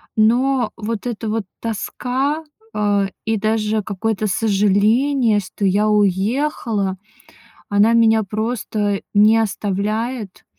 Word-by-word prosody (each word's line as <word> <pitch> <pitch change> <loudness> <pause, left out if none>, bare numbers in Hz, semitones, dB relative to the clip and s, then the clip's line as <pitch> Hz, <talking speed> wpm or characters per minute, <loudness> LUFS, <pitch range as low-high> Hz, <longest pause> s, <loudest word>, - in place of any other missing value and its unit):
Но 245 +3 +2
вот 225 0 -4
эта 225 -2 -4
вот 220 0 -1 0.2
тоска, 255 +7 -2 0.3
а, 205 -2 +1 0.2
и 220 0 0
даже 215 0 0
какое-то 215 +1 -2
сожаление, 215 +4 +2
что 200 +1 -4
я 205 +3 +2
уехала, 210 - 0 0.7
она 205 +3 +3
меня 225 -1 +4
просто 210 -1 -2
не 215 +2 +5
оставляет. 215 +1 -2
215 Hz, 100 wpm, -19 LUFS, 205-230 Hz, 0.7 s, не